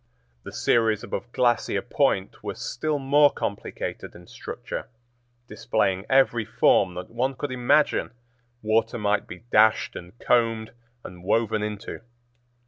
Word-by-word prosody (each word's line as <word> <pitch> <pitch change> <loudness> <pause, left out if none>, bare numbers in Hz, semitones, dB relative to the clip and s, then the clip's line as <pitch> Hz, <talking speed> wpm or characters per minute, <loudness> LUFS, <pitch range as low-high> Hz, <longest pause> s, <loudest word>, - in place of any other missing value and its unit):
The - - -9
series 110 -2 +1
above 120 - -5
Glacier 120 -1 +1
Point - - 0
was - - -5
still 150 +5 -2
more 145 +2 +4
complicated 100 - -5
in 85 - -13
structure, - - -7 0.6
displaying 105 -5 -1
every 130 -4 +3
form 95 -3 +2
that 90 0 -7
one 130 +3 -1
could 145 +1 -4
imagine 130 +4 +2 0.5
water 110 +2 +1
might 105 -1 0
be 90 - -10
dashed 110 +1 +4
and 90 +6 -10
combed 115 -3 +1 0.3
and 90 -1 -11
woven 110 +2 +1
into. 105 -1 -5
110 Hz, 130 wpm, -25 LUFS, 105-125 Hz, 0.6 s, more